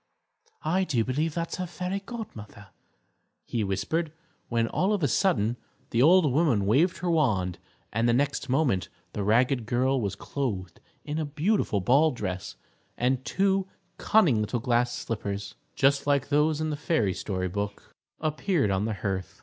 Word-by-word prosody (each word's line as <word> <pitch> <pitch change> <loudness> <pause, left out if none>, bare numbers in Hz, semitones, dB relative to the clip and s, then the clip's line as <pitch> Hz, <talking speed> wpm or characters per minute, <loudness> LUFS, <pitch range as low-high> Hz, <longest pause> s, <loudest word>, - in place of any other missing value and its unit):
"I 180 +5 +2
do 125 -11 0
believe 150 +5 -1
that's 170 -1 -3
her 185 -1 -3
Fairy 180 +3 -3
Godmother," 115 - -9 0.8
he 115 -3 -1
whispered, 155 - -1 0.4
when, 115 -1 +1
all 190 - +1
of 200 -6 -1
a - - +4
sudden, 120 - +1 0.3
the 115 - +2
old 160 0 +6
woman 135 -10 +2
waved 155 - +3
her 175 -1 -1
wand, 105 - +1 0.3
and 115 +2 +2
the - - +5
next 140 +1 0
moment 125 - +1 0.2
the 105 - -3
ragged 120 +3 +2
girl 130 +2 +1
was 100 -3 -2
clothed 100 -11 -4 0.3
in 150 +1 -3
a 155 - -1
beautiful 150 - 0
ball 140 - +4
dress, 95 -8 -4 0.4
and 125 +1 +1
two 195 +2 +1 0.3
cunning 160 - +4
little 110 +3 -1
glass 120 0 +1
slippers, 100 -4 -4 0.2
just 140 +1 +2
like 140 -1 +2
those 150 +1 +2
in 155 0 -1
the - - -1
fairy 145 - +1
story 95 -2 -3
book, 100 +2 -5 0.3
appeared 155 - 0
on 95 +2 0
the 110 -1 -2
hearth. 95 -3 -3
130 Hz, 160 wpm, -27 LUFS, 105-160 Hz, 0.8 s, old